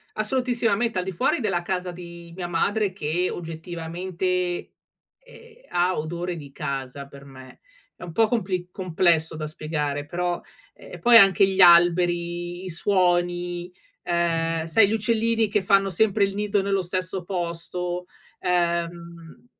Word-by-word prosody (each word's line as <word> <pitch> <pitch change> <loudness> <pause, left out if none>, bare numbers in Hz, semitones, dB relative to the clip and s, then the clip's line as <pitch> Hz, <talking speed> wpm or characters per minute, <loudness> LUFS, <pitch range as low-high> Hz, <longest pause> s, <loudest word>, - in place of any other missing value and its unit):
Assolutissimamente, 230 -2 0
al 180 - -1
di 190 - -4
fuori 250 +10 +1
della 190 -7 0
casa 180 0 -3
di 170 -1 -11
mia 175 -1 -5
madre, 200 +4 0
che 180 0 -1
oggettivamente, 170 +2 -6 0.9
ehm, 475 -2 -17 0.2
ha 180 +1 +1
odore 170 +3 -3
di 145 -3 -10
casa 135 0 -5
per 140 0 -14
me. 130 -2 -14 0.3
È - - -19
un 175 -2 -7
po' 225 +6 +3
compli 185 -6 -2
complesso 170 -3 +1
da 155 0 -4
spiegare, 150 -2 -3
però, 175 +2 -2 0.3
ehm, - - -14
e - - -8
poi 240 0 +6
anche 195 -2 +7
gli 190 0 -1
alberi, 175 0 +4
i 185 - -5
suoni, 175 -1 0 0.3
ehm, 165 -1 0
sai 195 +5 +5
gli - - -2
uccellini 225 0 +1
che 205 0 0
fanno 195 0 +3
sempre 205 +2 +2
il 195 0 -2
nido 205 -1 0
nello 195 -1 0
stesso 185 +1 -3
posto, 175 0 -4 0.3
ehm, 170 -2 +1
mhmm, 170 +2 -13
175 Hz, 145 wpm, -24 LUFS, 170-195 Hz, 0.9 s, anche